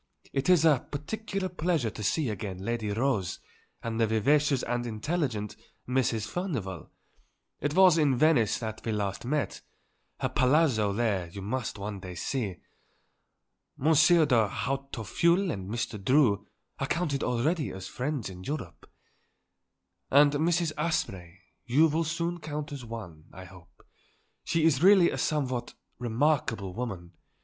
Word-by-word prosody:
It 135 Hz, +5 st, 0 dB
is 175 Hz, -3 st, +5 dB
a 150 Hz, -6 st, +3 dB
particular 195 Hz, +6 st, -4 dB
pleasure 165 Hz, -9 st, -1 dB
to 105 Hz, -, -8 dB
see 130 Hz, +6 st, 0 dB
again 100 Hz, -2 st, -4 dB
Lady 115 Hz, -2 st, -2 dB
Rose 110 Hz, -3 st, -1 dB, 0.4 s
and 115 Hz, 0 st, -3 dB
the 115 Hz, -, +4 dB
vivacious 135 Hz, +5 st, +2 dB
and 120 Hz, 0 st, -2 dB
intelligent 115 Hz, -, -2 dB, 0.3 s
Mrs. 125 Hz, -4 st, 0 dB
Furnivall; 125 Hz, -, -4 dB, 0.7 s
it 145 Hz, +2 st, -2 dB
was 185 Hz, -3 st, +6 dB
in 140 Hz, -5 st, +3 dB
Venice 140 Hz, -7 st, +3 dB
that 110 Hz, -2 st, -6 dB
we 115 Hz, -, -2 dB
last 100 Hz, 0 st, -3 dB
met; 150 Hz, +3 st, -1 dB, 0.6 s
her -, -, 0 dB
Palazzo 130 Hz, -6 st, +3 dB
there 100 Hz, -4 st, 0 dB
you 95 Hz, +3 st, -8 dB
must 115 Hz, +2 st, -3 dB
one 100 Hz, 0 st, -5 dB
day 90 Hz, -1 st, -8 dB
see. 105 Hz, -, -2 dB, 1.2 s
Monsieur 160 Hz, +3 st, +5 dB
de 120 Hz, -6 st, +3 dB
Hautefeuille 135 Hz, -, 0 dB
and 95 Hz, -7 st, -5 dB
Mr. 110 Hz, -3 st, -3 dB
Drew 115 Hz, -5 st, +3 dB, 0.3 s
I 135 Hz, -, -1 dB
counted 155 Hz, -5 st, -1 dB
already 145 Hz, +6 st, 0 dB
as 95 Hz, 0 st, -7 dB
friends 135 Hz, 0 st, -3 dB
in 90 Hz, -1 st, -9 dB
Europe." 105 Hz, -, -6 dB, 1.2 s
"And 145 Hz, +1 st, +6 dB
Mrs. 165 Hz, +2 st, +1 dB
Asprey 95 Hz, -, -2 dB, 0.3 s
you 140 Hz, +6 st, +5 dB
will 160 Hz, +2 st, 0 dB
soon 170 Hz, +2 st, -2 dB
count 150 Hz, -1 st, -5 dB
as 140 Hz, -3 st, -6 dB
one, 100 Hz, -10 st, -8 dB
I 95 Hz, -, -10 dB
hope. 90 Hz, -1 st, -17 dB, 0.6 s
She 165 Hz, -1 st, 0 dB
is 155 Hz, -4 st, +3 dB
really 190 Hz, -1 st, +6 dB
a -, -, -3 dB
somewhat 130 Hz, -5 st, -1 dB, 0.2 s
remarkable 120 Hz, -5 st, 0 dB
woman. 100 Hz, -7 st, -5 dB
125 Hz, 140 wpm, -28 LUFS, 105-155 Hz, 1.2 s, was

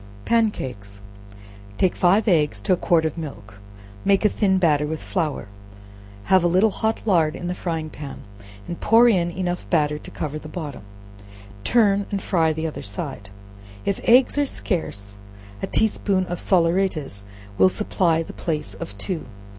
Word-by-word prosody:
Pan 230 Hz, -1 st, +3 dB
Cakes. 100 Hz, -, -8 dB, 0.8 s
Take 185 Hz, -, +2 dB
five 195 Hz, +5 st, +3 dB
eggs 150 Hz, -, +2 dB
to -, -, +3 dB
a -, -, +4 dB
quart 170 Hz, -2 st, +2 dB
of 160 Hz, +1 st, -2 dB
milk, 105 Hz, -10 st, -9 dB, 0.4 s
make 200 Hz, +1 st, +3 dB
a -, -, +6 dB
thin 195 Hz, -3 st, +2 dB
batter 150 Hz, -5 st, +2 dB
with 160 Hz, 0 st, -3 dB
flour, 155 Hz, -, -2 dB, 0.8 s
have 190 Hz, -, +4 dB
a -, -, +4 dB
little 185 Hz, +5 st, +3 dB
hot 220 Hz, +3 st, -1 dB
lard 165 Hz, -7 st, +2 dB
in -, -, -7 dB
the 180 Hz, -, -1 dB
frying 165 Hz, -3 st, -4 dB
pan, 145 Hz, -2 st, -8 dB, 0.4 s
and 175 Hz, -, -6 dB
pour 230 Hz, +2 st, +6 dB
in 180 Hz, -7 st, +3 dB
enough 175 Hz, 0 st, -3 dB
batter 150 Hz, -2 st, +1 dB
to -, -, -11 dB
cover 155 Hz, 0 st, -4 dB
the 155 Hz, -, -10 dB
bottom; 150 Hz, -5 st, -6 dB, 0.8 s
turn 205 Hz, -, +3 dB
and 200 Hz, -, -2 dB
fry 165 Hz, -4 st, +2 dB
the 160 Hz, +1 st, -3 dB
other 160 Hz, -, -4 dB
side; 100 Hz, 0 st, -6 dB, 0.6 s
if 200 Hz, -, 0 dB
eggs 250 Hz, +4 st, +5 dB
are 290 Hz, -, +3 dB
scarce, 100 Hz, -, -3 dB, 0.4 s
a -, -, -2 dB
tea -, -, +3 dB
spoonful 190 Hz, -4 st, 0 dB
of 175 Hz, -, -4 dB
salaeratus 165 Hz, -, +1 dB, 0.4 s
will 185 Hz, -, +7 dB
supply 175 Hz, -5 st, +1 dB
the -, -, -10 dB
place 150 Hz, -, -3 dB
of 100 Hz, +1 st, -8 dB
two. 160 Hz, -, -4 dB
170 Hz, 170 wpm, -23 LUFS, 150-195 Hz, 0.8 s, will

